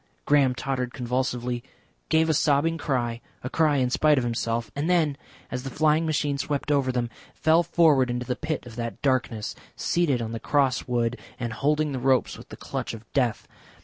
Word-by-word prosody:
Graham 140 -3 +4
tottered 125 -2 -3
convulsively, 125 -1 -2 0.5
gave 160 0 +4
a 160 - +3
sobbing 155 +2 +2
cry, 120 -5 -1 0.2
a 130 - -4
cry 155 -3 +3
in 125 -2 +1
spite 150 +2 +4
of 130 - +2
himself, 115 -2 -2
and 145 +4 -1
then, 160 -5 +3 0.4
as 125 - -3
the 135 - -5
flying 155 +4 +2
machine 145 -2 0
swept 145 +2 -2
over 140 -3 +2
them, 125 -1 -1 0.3
fell 160 +2 +4
forward 150 -7 +4
into 125 0 -2
the 125 - -1
pit 155 -2 -3
of 120 -1 -11
that 115 -1 -4
darkness, 125 -5 0 0.2
seated 160 -7 +1
on 115 -1 -4
the 115 - -4
cross 135 -3 +1
wood 120 -1 0 0.2
and 120 -2 -3
holding 150 +5 +1
the 130 - -3
ropes 130 0 +2
with - - -13
the - - -9
clutch - - -4
of 115 0 -12
death. 125 -5 0
130 Hz, 190 wpm, -26 LUFS, 120-150 Hz, 0.5 s, Graham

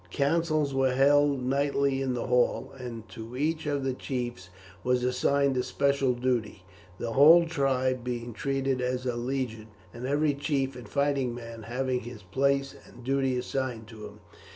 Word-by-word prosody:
Councils 155 - +1
were 135 -1 +2
held 140 0 +4
nightly 140 0 +1
in 130 -2 -1
the 120 - -3
hall, 125 +2 +1
and 120 -4 -7
to 115 +2 -8
each 155 +2 -1
of 145 -2 -1
the 135 -1 0
chiefs 120 -8 -4 0.3
was 125 0 +1
assigned 135 +2 +2
a - - +3
special 140 -1 +1
duty, 120 -6 -1 0.3
the 115 - -3
whole 160 +6 +8
tribe 130 -5 0
being 120 -1 -4
treated 135 +1 -1
as 125 0 -2
a 125 -2 -1
legion, 120 -3 -3 0.3
and 120 +2 -5
every 145 +1 +2
chief 135 -2 -1
and 120 -4 -10
fighting 140 -2 0
man 115 -1 -8
having 125 +2 -1
his 120 -3 -9
place 135 +7 +1
and 125 - -14
duty 135 0 +1
assigned 125 -2 -3
to 110 -2 -9
him. 105 0 -15
130 Hz, 165 wpm, -28 LUFS, 120-140 Hz, 0.3 s, whole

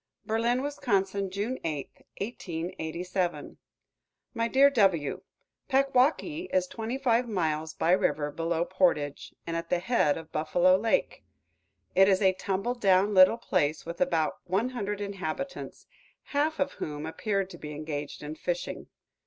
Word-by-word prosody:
BERLIN, 235 +3 +1
WIS., 285 0 -4 0.5
June 205 +7 -3
8, 150 -4 -3 0.3
1887. 180 -3 -3 0.8
My 230 -1 0
dear 275 +3 +5
W: 190 - +2 0.5
Packwaukee 275 +5 +2
is 185 -1 +2
twenty 225 +6 -4
five 245 -2 +2
miles 160 -5 -1
by 165 - +1
river 150 -5 +2
below 165 +2 -1
Portage, 170 -7 0
and 165 - -3
at 165 0 -4
the 180 - +2
head 175 -6 +2
of 160 -1 -10
Buffalo 175 +4 +3
Lake. 220 +4 0 0.7
It 195 +1 +6
is 190 -1 +4
a 190 -1 +5
tumble 195 +5 -2
down 200 -3 +3
little 185 +4 +7
place, 155 -9 0
with 170 +1 -7
about 170 -3 +1
one 195 +7 0
hundred 205 -5 -3
inhabitants, 200 - -5 0.4
half 300 +2 -1
of 280 0 +1
whom 150 0 -5
appeared 195 +3 -2
to - - -10
be 150 - -7
engaged 150 -1 -5
in 150 +1 -5
fishing. - - -4
190 Hz, 140 wpm, -28 LUFS, 165-235 Hz, 0.8 s, little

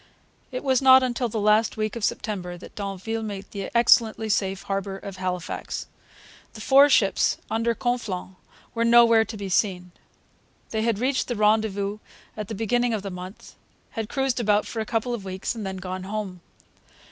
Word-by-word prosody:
It 255 - -4
was 265 -2 +2
not 260 0 +7
till 240 0 -1
the 220 - -3
last 215 +2 +3
week 215 0 -2
of 230 - -5
September 180 -5 -2
that 175 - -12
d'Anville 200 +3 -4
made 205 -3 -5
the 200 -2 -5
excellently 225 -2 +4
safe 195 -2 0
harbour 195 0 -3
of 195 -1 -9
Halifax. 180 -2 -4 0.7
The 215 - -10
four 275 +4 +6
ships 200 -7 +3
under 230 +1 +1
Conflans 225 -8 -3 0.4
were 230 - 0
nowhere 230 -1 +6
to 220 - -7
be 200 -1 -5
seen. 180 -2 0 0.8
They 220 - -1
had 225 -2 +1
reached 255 +4 0
the 240 - -2
rendezvous 210 -1 +1 0.4
at 215 -2 -5
the 220 - -5
beginning 235 +2 +1
of 205 - -5
the 195 - -5
month, 180 +2 -9 0.4
had 225 -2 -4
cruised 270 -3 0
about 210 -2 +2
for 230 - -5
a 220 - -3
couple 235 +2 -1
of 230 -5 -4
weeks, 190 0 -4
and 225 -2 -6
had 190 - -4
then - - -7
gone 185 0 -5
home. 195 -3 -5
215 Hz, 180 wpm, -25 LUFS, 195-230 Hz, 0.8 s, not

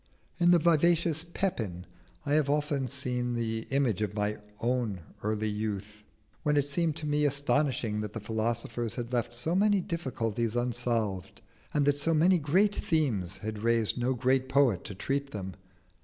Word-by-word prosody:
In 175 0 +5
the 175 - +7
vivacious 165 -1 +3
Pepin 110 - -2 0.4
I 145 - 0
have 150 -2 +3
often 145 -2 0
seen 125 -3 -2
the 115 -1 -2
image 135 -7 +1
of 105 -1 -2
my 105 0 -1 0.8
early 110 +1 0
youth, 105 0 -4 0.4
when 150 0 +1
it 145 - +3
seemed 155 +2 0
to 155 - -4
me 150 0 +1
astonishing 140 -6 +1
that 105 -1 -5
the 115 - -4
philosophers 115 +1 -2
had 120 0 -5
left 120 -1 -1
so 140 +8 0
many 205 +2 +4
difficulties 120 - -2
unsolved, 115 -6 -1 0.3
and 145 -1 +2
that 145 0 +2
so 165 +2 +2
many 175 +3 +5
great 185 +8 +3
themes 110 - 0
had 110 -1 -3
raised 115 -1 +2
no 125 +1 0
great 130 +1 +1
poet 130 -10 +3
to 100 - -6
treat 140 +7 -2
them. 95 -6 -5
125 Hz, 160 wpm, -29 LUFS, 110-150 Hz, 0.8 s, the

